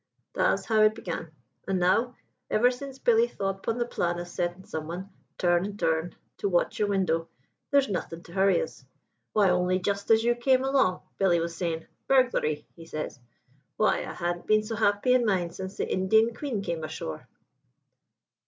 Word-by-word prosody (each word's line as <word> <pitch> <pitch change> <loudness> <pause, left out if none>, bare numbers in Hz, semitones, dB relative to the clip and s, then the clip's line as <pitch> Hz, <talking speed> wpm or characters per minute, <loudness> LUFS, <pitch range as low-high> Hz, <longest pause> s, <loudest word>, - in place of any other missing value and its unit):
Tha's - - +1
how 220 -2 +3
it 215 0 +5
began. 165 -7 -5 0.4
An' 195 -1 +1
now, 225 +7 +2 0.3
ever 245 +4 +4
since 265 +1 -8
Billy 470 - +4
thought 195 - -3
'pon 230 +3 -1
the 240 - 0
plan 175 -7 -1
of 175 0 -5
settin' 175 +1 -3
someone, 170 +5 -6 0.3
turn 175 0 +3
an' 205 +1 -5
turn, 160 -2 0 0.2
to 200 - 0
watch 175 -2 +1
your 210 - +2
window, 180 -5 0 0.4
there's 280 -1 +4
nothin' 175 -4 -4
to - - -14
hurry 195 - +3
us. 480 - -9 0.5
Why, 200 -3 +4
only 180 +1 +2
just 200 +2 -2
as 225 0 +5
you 240 +1 +3
came 255 +2 +2
along, 265 -9 +2 0.2
Billy 180 -3 +4
was 170 0 -3
saying, 165 -2 -2 0.2
'Burglary!' 245 - +2
he 165 -1 -12
says, 155 -4 -5 0.6
'why, 215 - +3
I - - -5
han't 175 0 -3
been 215 0 +4
so 225 +1 -4
happy 210 +3 +2
in 255 -1 +4
mind 185 -6 0
since 190 +1 -7
the - - -1
Indian 220 +5 +3
Queen 240 -5 -3
came 170 -4 -3
ashore!'' 80 - -6
195 Hz, 180 wpm, -27 LUFS, 175-225 Hz, 0.6 s, it